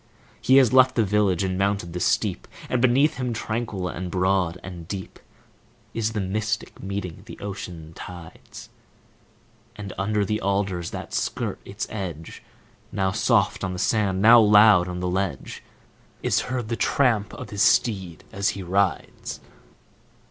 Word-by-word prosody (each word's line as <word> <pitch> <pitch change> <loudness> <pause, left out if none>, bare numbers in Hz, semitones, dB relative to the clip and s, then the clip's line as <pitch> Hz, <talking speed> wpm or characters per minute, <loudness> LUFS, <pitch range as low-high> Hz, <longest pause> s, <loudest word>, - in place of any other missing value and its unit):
He 130 - +5
has 130 -3 +5
left 130 0 +6
the 115 - +3
village 100 -3 +1
and 95 0 -2
mounted 100 -3 -1
the 90 - -3
steep, - - 0 0.2
And 125 - 0
beneath 130 +4 +3
him, 125 -2 -2
tranquil 110 -4 -3
and 90 +1 -5
broad 90 -1 +1
and 85 -4 -9
deep, 95 -1 -7 0.7
Is 115 0 -1
the 110 - -2
Mystic, 105 +3 -3
meeting 95 -3 -5
the - - -9
ocean 90 -5 -7
tides; 85 -1 -11 1.1
And 100 -1 -7
under 105 +1 0
the 105 +2 -2
alders, 95 -3 -1
that - - -7
skirt - - -2
its 100 +1 -5
edge, 90 -7 -6 0.5
Now 95 -1 0
soft - - +1
on 95 - -2
the - - -5
sand, 95 -1 +1
now 115 +2 +9
loud 105 -3 +6
on 90 0 -5
the 90 - -1
ledge, 90 -5 -3 0.6
Is - - +2
heard 125 -3 -3
the 115 - 0
tramp 115 -6 +1
of - - -9
his 100 -1 -2
steed 95 -10 +2
as 100 0 0
he 95 - -5
rides. 95 -2 -1
100 Hz, 155 wpm, -24 LUFS, 90-110 Hz, 1.1 s, now